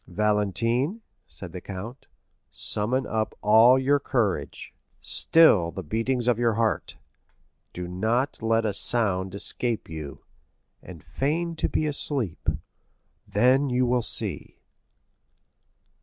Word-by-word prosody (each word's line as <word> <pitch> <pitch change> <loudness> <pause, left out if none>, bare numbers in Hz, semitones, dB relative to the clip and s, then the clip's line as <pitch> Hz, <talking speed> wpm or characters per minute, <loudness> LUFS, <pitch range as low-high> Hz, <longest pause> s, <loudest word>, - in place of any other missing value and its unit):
"Valentine," 105 - -1 0.3
said 80 +3 -8
the 90 - -8
count, 105 +7 -9 0.4
"summon 125 +6 +1
up 110 -1 -3
all 110 +5 +6
your 140 +2 +1
courage; 120 -7 -3 0.3
still 110 - +5
the 95 +2 -7
beatings 115 - -2
of 120 -2 +1
your 120 -2 +1
heart; 115 0 -2 0.7
do 90 0 -6
not 110 +11 -2
let 115 0 0
a 105 - -1
sound 95 -4 +1
escape 115 +1 -1
you, 80 -3 -9 0.6
and 85 -5 -13
feign 165 +5 -3
to - - -2
be 155 - -1
asleep; 140 - +2 0.8
then 125 +7 +2
you 125 0 +1
will 125 0 +1
see." - - -3
115 Hz, 115 wpm, -25 LUFS, 100-130 Hz, 0.8 s, all